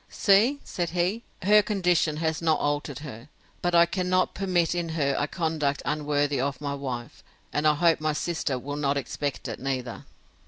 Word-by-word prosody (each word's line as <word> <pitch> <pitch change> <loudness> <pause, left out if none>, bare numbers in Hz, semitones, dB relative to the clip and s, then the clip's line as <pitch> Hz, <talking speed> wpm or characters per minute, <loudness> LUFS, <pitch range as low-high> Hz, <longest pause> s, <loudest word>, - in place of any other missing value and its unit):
See, 220 +8 +3
said 175 -2 -3
he, 180 +6 0 0.2
her 210 +2 +6
condition 180 -7 +1
has 160 0 -1
not 160 -2 +2
altered 145 -2 -1
her; 125 0 -9 0.3
but 175 0 +1
I 170 0 +7
cannot 185 +1 0
permit 180 -4 +1
in 175 -1 -2
her 140 -4 0
a 145 - 0
conduct 155 -4 -1
unworthy 145 -2 0
of 135 -1 -2
my 145 -1 -3
wife; 130 -4 -6 0.3
and 150 +1 +2
I 150 - +4
hope 165 0 +3
my 155 0 +1
sister 155 -4 -2
will 145 +3 -5
not 140 -1 0
expect 140 0 -3
it 115 - -5
neither. 130 -3 -4
155 Hz, 180 wpm, -26 LUFS, 140-175 Hz, 0.3 s, I